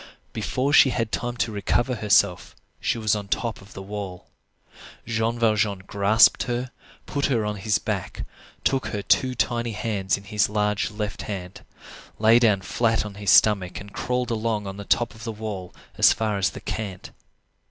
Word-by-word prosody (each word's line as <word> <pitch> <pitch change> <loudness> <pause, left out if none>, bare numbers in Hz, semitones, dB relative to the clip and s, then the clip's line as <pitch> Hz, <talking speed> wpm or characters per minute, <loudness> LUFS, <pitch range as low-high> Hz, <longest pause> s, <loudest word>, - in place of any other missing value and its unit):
Before 130 +6 -1
she 140 - +7
had 115 -3 -2
time 120 +1 -3
to 115 - 0
recover 110 +5 0
herself, 100 -4 +2 0.2
she - - -1
was 110 -1 +1
on 100 -1 -5
the - - +2
top 115 -3 -4
of 100 +1 -15
the 95 - -8
wall. 100 -2 -7 0.8
Jean 115 +1 -1
Valjean 105 -4 +1
grasped 100 +3 +4
her, 125 +1 -3 0.3
put 140 -1 -1
her 115 -6 0
on 105 0 -3
his 105 +2 +1
back, - - -4 0.4
took 135 -1 +1
her 100 -1 -4
two 125 +7 +2
tiny 115 0 -1
hands 105 -3 -1
in 100 - -12
his 105 +1 0
large 105 -1 0
left 105 -1 -5
hand, 95 -3 -6 0.6
lay 110 +2 +5
down 105 -5 +3
flat 115 +3 0
on 105 - -7
his 100 -1 -3
stomach 95 -2 +4
and 100 +1 -11
crawled 125 0 -2
along 110 -2 -1
on 100 +1 -6
top 120 0 +1
of 110 -1 -13
the 115 - -3
wall 105 -4 -6 0.3
as - - +7
far 105 -3 -1
as 95 - +2
the - - -10
cant. 100 -4 -5
105 Hz, 180 wpm, -24 LUFS, 100-115 Hz, 0.8 s, she